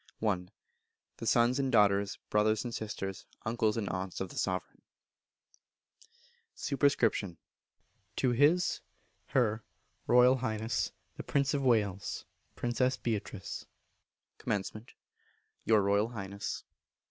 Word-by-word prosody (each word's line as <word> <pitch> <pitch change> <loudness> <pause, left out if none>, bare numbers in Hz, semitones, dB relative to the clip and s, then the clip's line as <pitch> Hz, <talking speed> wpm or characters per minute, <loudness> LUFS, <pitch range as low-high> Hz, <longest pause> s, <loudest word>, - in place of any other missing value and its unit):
i. 90 -3 +1 0.7
The 115 - -5
Sons 120 +4 +4
and 135 -1 +1
Daughters, 100 -3 +3
Brothers 105 +1 +3
and 120 -1 -5
Sisters, 100 -4 -5 0.2
Uncles 110 -1 +1
and 105 -3 -1
Aunts 95 0 -4
of 95 - -3
the - - -11
Sovereign. 95 -2 -2 1.7
Sup. 125 - +1 0.8
To 130 - +2
His 150 +8 +3 0.5
(Her) 110 -4 +1 0.4
Royal 125 +2 +6
Highness 110 -2 -1 0.3
the - - -5
Prince 140 -1 +1
of 140 - +1
Wales 105 -7 +1 0.3
(Princess 125 +2 +1
Beatrice). 105 -3 -4 0.7
Comm. 105 +3 -3 0.8
Your 110 -3 +5
Royal 100 +2 +3
Highness. 100 -3 -5
110 Hz, 105 wpm, -32 LUFS, 100-125 Hz, 1.7 s, Royal